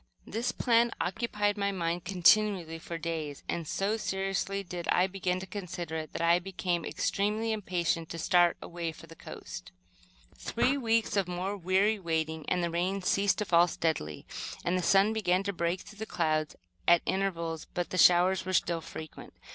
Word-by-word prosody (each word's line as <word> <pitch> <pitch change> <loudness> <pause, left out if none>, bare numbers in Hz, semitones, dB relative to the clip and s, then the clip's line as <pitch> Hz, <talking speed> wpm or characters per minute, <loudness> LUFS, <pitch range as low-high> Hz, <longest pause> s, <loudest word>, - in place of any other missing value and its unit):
This 230 +4 -2
plan 235 0 +3
occupied 205 +1 -1
my 200 0 +1
mind 170 -2 -2
continually 180 -2 +3
for 170 0 -6
days, 160 -3 -4
and, 165 -2 -3
so 200 +7 0
seriously 195 -1 -2
did 175 -2 -6
I 180 - +4
begin 185 -1 -2
to - - -5
consider 180 -4 -5
it, 155 -1 -6
that - - -2
I 170 +1 +5
became 180 -2 -2
extremely 210 +7 -1
impatient 175 -6 -1
to 165 - -5
start 175 +1 +3
away 170 -1 -4
for 165 - -13
the 165 0 -13
coast. 90 - -9 0.6
Three 255 +4 0
weeks 230 -5 +1
more 180 +2 -3
of 195 -4 -10
weary 200 +3 +3
waiting, 160 -3 -2
and 180 -1 +1
the 170 - -1
rain 185 +3 -1
ceased 200 +2 +2
to 210 - -1
fall 175 -1 +5
steadily, 155 - -2 0.4
and 175 - +1
then - - +2
the - - 0
sun 195 +4 +4
began 190 -4 +1
to 200 0 -2
break 170 +1 -1
through 210 - -14
the 220 - -4
clouds 155 -1 0 0.3
at 175 -1 +6
intervals, 170 -4 -2
but 175 -1 -2
the 185 - -1
showers 180 +2 +5
were 185 0 -4
still 170 -2 +1
frequent. 155 -1 -9
180 Hz, 180 wpm, -30 LUFS, 170-200 Hz, 0.6 s, at